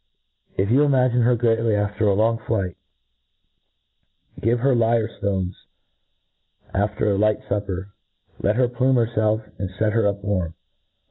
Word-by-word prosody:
If 100 +3 +1
you 135 +4 +5
imagine 130 -4 +3
her 120 +1 +4
greafy 115 -1 +2
after 105 +1 0
a 100 - +3
long 115 +2 +2
flight, 100 -6 -2 1.6
give 115 +2 +1
her 135 +1 +3
ftones 110 -5 0 1.2
after 105 +1 0
a 100 - +1
light 105 0 +2
fupper; 100 -1 -3 0.3
— - - -37
let 105 +2 +1
her 125 +1 +3
plume 130 +2 +1
hcrfelf, 110 -2 +1
and 95 - -3
fct 105 +3 -1
her 115 -1 +2
up 100 -1 -2
warm. 90 -5 -2
110 Hz, 140 wpm, -22 LUFS, 100-115 Hz, 1.6 s, you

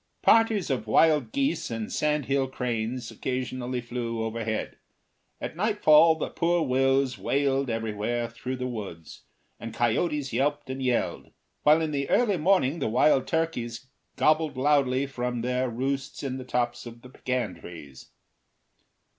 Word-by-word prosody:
Parties 225 -7 +4
of 120 -5 -2
wild 150 0 +3
geese 140 +4 -1
and 115 -2 -4
sandhill 140 -3 0
cranes 120 -2 -3
occasionally 125 -1 -3
flew 115 -1 -4
overhead. 110 -1 -3 0.6
At - - -5
nightfall 165 -5 +5
the 160 - -4
poor 170 0 +1
wills 135 -1 +1
wailed 135 -1 0
everywhere 115 +1 -2
through 125 +2 -5
the 125 0 -4
woods, 100 -9 -8 0.3
and 115 -1 -7
coyotes 135 +3 0
yelped 145 +2 0
and 135 0 -5
yelled, 125 -2 -1 0.3
while 155 +2 +5
in 160 -1 -1
the 140 -1 -2
early 215 -6 +3
morning 170 -3 +2
the 135 - -1
wild 130 +3 +3
turkeys 130 -7 -2 0.3
gobbled 155 -3 +2
loudly 135 -1 +2
from 125 -3 -3
their 125 +1 -1
roosts 135 +5 -3
in 130 -1 -3
the 130 - -8
tops 120 -1 -2
of 120 0 -12
the 125 - -12
pecan 125 -9 -3
trees. 75 -6 -11
130 Hz, 140 wpm, -27 LUFS, 120-145 Hz, 0.6 s, nightfall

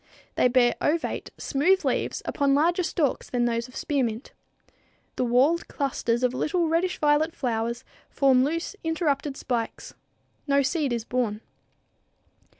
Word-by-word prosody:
They - - +3
bear 245 -1 +3
ovate, 320 +2 -1
smooth 360 +7 +1
leaves - - -1
upon 280 -1 +1
longer 340 +5 +2
stalks 320 -5 -1
than 245 -1 0
those 235 0 -1
of 250 - -16
spearmint. 250 -5 -2 0.8
The - - 0
whorled 260 +8 +2
clusters 250 -3 -1
of 250 0 +2
little, 335 +6 0
reddish 335 +3 0
violet 300 +2 +2
flowers 235 -1 -2 0.3
form 265 -2 +3
loose, 330 +7 -2
interrupted 300 -4 -1
spikes. 235 -3 -4 0.5
No 280 0 +3
seed 290 -1 0
is 235 -2 -2
borne. 230 -4 -1
275 Hz, 135 wpm, -26 LUFS, 245-315 Hz, 0.8 s, They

